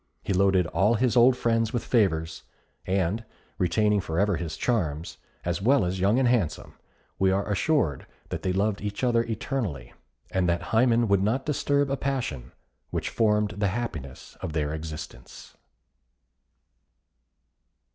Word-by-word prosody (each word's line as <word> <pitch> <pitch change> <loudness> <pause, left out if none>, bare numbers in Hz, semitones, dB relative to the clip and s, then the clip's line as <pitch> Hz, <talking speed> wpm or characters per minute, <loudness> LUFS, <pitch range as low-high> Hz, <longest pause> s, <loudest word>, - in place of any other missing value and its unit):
He - - -1
loaded 95 -1 +3
all 100 +6 +2
his 125 +2 +1
old 125 +1 +6
friends 115 0 +1
with 120 - -1
favours; 80 -8 +1 0.5
and, 95 +4 0 0.4
retaining 105 +3 +2
for 80 -3 -4
ever 100 -1 +2
his 80 -3 -5
charms, 85 -10 -1 0.3
as 85 +2 -1
well 130 0 +3
as 90 +1 -2
Young 100 +5 +3
and 130 -1 +3
Handsome, 110 -11 0 0.5
we 95 0 +4
are 95 +1 0
assured 105 - 0 0.2
that - - -4
they 95 - 0
loved 100 +2 0
each 105 +3 -4
other 120 -2 +3
eternally, 110 - -4 0.4
and 95 -2 +1
that 85 +5 -2
Hymen 115 0 +4
would 100 -1 +3
not 115 +7 0
disturb 145 -1 +1
a 140 - 0
passion 120 - -3 0.4
which - - -2
formed 105 -2 +2
the 105 -1 +1
happiness 90 - -5
of 80 - -4
their 75 -1 -1
existence. 75 -6 -8
100 Hz, 145 wpm, -26 LUFS, 85-115 Hz, 0.5 s, old